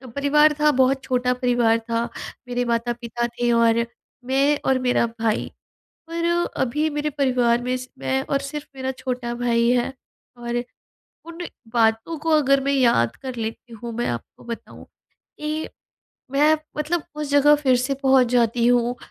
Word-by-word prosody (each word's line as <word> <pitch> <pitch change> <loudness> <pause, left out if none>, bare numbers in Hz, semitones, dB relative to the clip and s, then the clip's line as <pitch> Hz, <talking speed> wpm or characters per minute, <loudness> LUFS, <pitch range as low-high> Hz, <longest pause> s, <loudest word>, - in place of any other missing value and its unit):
परिवार 300 +2 +4
था 300 0 +5
बहुत 265 +1 +2
छोटा 250 0 +1
परिवार 245 -2 +2
था। 230 0 +1 0.5
मेरे 245 0 -1
माता-पिता 235 0 -2
थे 240 0 -1
और 230 0 +3 0.4
मैं 280 +2 +2
और 265 -1 +3
मेरा 250 -1 +2
भाई। 225 -1 0 0.6
पर, 335 0 -2 0.4
अभी 300 +5 0
मेरे 295 0 -2
परिवार 250 -4 +1
में 250 +1 -1
सि 255 0 -9
मैं 135 0 0
और 275 - +2
सिर्फ 285 +1 -6
मेरा 265 0 -3
छोटा 250 -2 -4
भाई 235 -1 +2
है 250 +2 +1 0.4
और 240 0 -3 0.6
उन, 335 0 -10 0.4
बातों 225 +7 +2
को 325 +2 -2
अगर 275 -3 +4
मैं 280 - +1
याद 235 - +3
कर 260 -2 -5
लेती 225 +1 -5
हूँ, 230 +1 -7
मैं 240 +1 -2
आपको 120 -1 -6
बताऊँ 235 -1 -8 0.5
कि, 305 +1 -3 0.6
मैं 300 +3 +4 0.2
मतलब 310 +2 -1
उस 300 -1 -4
जगह 285 +1 +6
फिर 265 -4 +3
से 260 +3 -1
पहुँच 265 -2 +5
जाती 235 -1 +2
हूँ 245 0 +2
250 Hz, 155 wpm, -23 LUFS, 235-280 Hz, 0.6 s, जगह